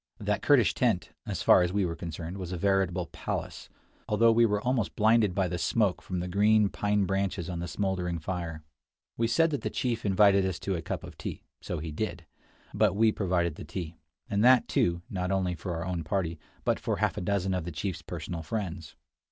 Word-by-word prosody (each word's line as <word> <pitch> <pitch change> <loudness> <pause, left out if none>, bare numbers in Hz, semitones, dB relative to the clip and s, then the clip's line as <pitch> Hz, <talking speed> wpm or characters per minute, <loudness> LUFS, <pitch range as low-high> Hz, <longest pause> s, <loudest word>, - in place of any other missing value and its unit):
That - - -1
Kurdish - - +4
tent, - - 0 0.2
as - - -3
far - - +7
as 90 0 +1
we 100 0 +1
were 85 -1 -3
concerned, 85 +3 -6
was 90 -1 -5
a 90 - -3
veritable 95 -1 +1
palace, - - -5 0.4
although 115 +2 +5
we 115 +1 +5
were 105 -1 +1
almost 125 -2 -1
blinded 110 -3 +3
by 95 -2 +2
the 90 0 -3
smoke 100 0 +1
from 90 -2 -4
the 90 - -3
green 105 +2 +4
pine 105 0 +1
branches 95 -2 -1
on 85 -2 -4
the 85 - -4
smoldering 90 -1 -1
fire. 80 -1 -4 0.5
We 115 - +1
said 165 +8 +3
that 145 - -2
the - - -2
chief 120 -2 -2
invited 100 0 +5
us 95 -2 -1
to 100 - -1
a 85 - -3
cup - - -4
of - - -11
tea: - - -6 0.2
so 90 - -4
he 80 +1 -5
did 85 0 -4 0.2
— - - -30
but 105 -4 +3
we 110 +1 +4
provided 85 -6 0
the - - -7
tea; 85 -3 -6 0.3
and 105 -2 0
that, 125 0 +6
too, 85 0 +1
not 90 -1 -3
only 95 -2 0
for 90 +1 -5
our 85 0 -4
own 90 -2 -2
party, 85 -1 -2 0.2
but - - +1
for - - -1
half - - 0
a - - -4
dozen 95 0 0
of 90 -2 -1
the 85 - -5
chief's 85 +3 -4
personal 85 -2 -5
friends. 85 -3 -5
95 Hz, 215 wpm, -29 LUFS, 85-105 Hz, 0.5 s, far